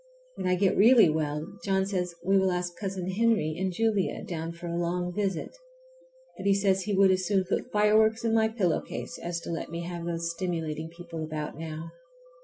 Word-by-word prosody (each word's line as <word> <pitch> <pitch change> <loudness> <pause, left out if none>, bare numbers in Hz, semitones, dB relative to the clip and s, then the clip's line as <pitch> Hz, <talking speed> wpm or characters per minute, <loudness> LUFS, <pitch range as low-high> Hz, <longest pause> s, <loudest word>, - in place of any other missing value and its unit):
When 185 - -4
I 180 - +3
get 190 +1 +2
really 225 -2 +7
well 150 -1 -1 0.2
John 190 -1 +1
says 180 -3 -2
we 195 +1 +4
will 190 0 +2
ask 180 -1 -2
Cousin 190 -3 -4
Henry 215 -6 +2
and 190 +2 -1
Julia 210 0 0
down 165 -1 -4
for 170 +1 -10
a 170 0 -3
long 175 +1 -1
visit; 195 - -2 0.8
but - - -3
he 200 - +5
says 195 -1 +2
he 205 - 0
would 195 0 +6
as 185 -1 +1
soon 195 -2 +2
put 195 +7 -2
fire 210 0 +3
works 220 +1 +3
in 225 - +2
my 220 -1 +4
pillow 205 -7 0
case 170 - -7
as 170 0 -3
to - - -6
let 165 - -4
me 170 +1 -4
have 170 -1 -5
those 170 0 -2
stimulating 165 -3 -3
people 170 -1 -7
about 155 -1 -4
now. 160 +1 -6
180 Hz, 205 wpm, -28 LUFS, 170-200 Hz, 0.8 s, really